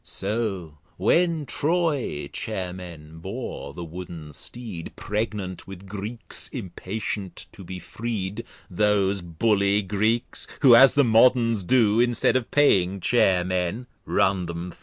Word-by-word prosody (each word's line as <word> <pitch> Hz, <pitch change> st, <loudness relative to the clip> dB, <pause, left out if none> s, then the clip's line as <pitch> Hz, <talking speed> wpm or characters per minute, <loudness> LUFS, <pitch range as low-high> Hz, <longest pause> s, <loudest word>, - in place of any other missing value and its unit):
So 95 Hz, -7 st, -3 dB, 0.2 s
when 165 Hz, -3 st, +2 dB
Troy 150 Hz, -, -1 dB
Chair 95 Hz, -5 st, -4 dB
men 80 Hz, -4 st, -10 dB
bore 95 Hz, -, -6 dB
the 85 Hz, -, -6 dB
Wooden 85 Hz, -2 st, -8 dB
Steed, 110 Hz, -7 st, -8 dB
Pregnant 105 Hz, -3 st, -4 dB
with 95 Hz, 0 st, -10 dB
Greeks, 105 Hz, +4 st, -3 dB
impatient 100 Hz, -2 st, -5 dB
to 95 Hz, -, -12 dB
be 90 Hz, +1 st, -7 dB
freed, 100 Hz, +1 st, -4 dB, 0.2 s
(Those 100 Hz, 0 st, +1 dB
Bully 100 Hz, +4 st, +1 dB
Greeks, 110 Hz, +4 st, 0 dB
who, 135 Hz, -4 st, +8 dB
as 135 Hz, +3 st, +7 dB
the 145 Hz, -, +5 dB
Moderns 115 Hz, -2 st, +4 dB
do, 110 Hz, 0 st, +3 dB
Instead 120 Hz, 0 st, +2 dB
of 130 Hz, -3 st, 0 dB
paying 100 Hz, -10 st, +3 dB
Chair 95 Hz, -3 st, +3 dB
men, 90 Hz, +6 st, -2 dB, 0.2 s
run 95 Hz, -2 st, +1 dB
them 85 Hz, +1 st, -5 dB
thro'.) -, -, -19 dB
100 Hz, 130 wpm, -25 LUFS, 90-115 Hz, 0.2 s, who